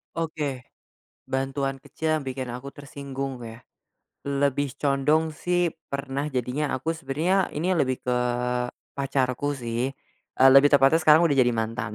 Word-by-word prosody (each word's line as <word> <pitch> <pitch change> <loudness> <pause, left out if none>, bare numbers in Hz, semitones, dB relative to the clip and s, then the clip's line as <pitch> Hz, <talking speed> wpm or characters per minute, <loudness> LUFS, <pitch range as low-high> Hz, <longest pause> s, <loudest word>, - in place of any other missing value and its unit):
Oke, 150 -5 -3 0.6
bantuan 135 0 -2
kecil 155 +1 -2
yang 140 - -9
bikin 130 -1 -4
aku 125 +3 -7
tersinggung 140 -2 -6
ya, 115 +1 -9 0.7
lebih 140 -1 0
condong 150 +3 +1
sih 175 +2 0 0.2
pernah 140 +1 -3
jadinya 135 +1 -2
aku 135 +5 -2
sebenarnya 165 +5 0
ini 170 +5 0
lebih 135 -8 0
ke, 125 0 0 0.7
pacarku 140 +1 -1
sih, 120 0 -2 0.5
eee, 135 +1 +7
lebih 135 +2 +8
tepatnya 145 +3 +5
sekarang 155 +1 +6
udah 145 -5 +2
jadi 125 -1 +4
mantan. 110 0 -3
140 Hz, 135 wpm, -25 LUFS, 130-150 Hz, 0.7 s, lebih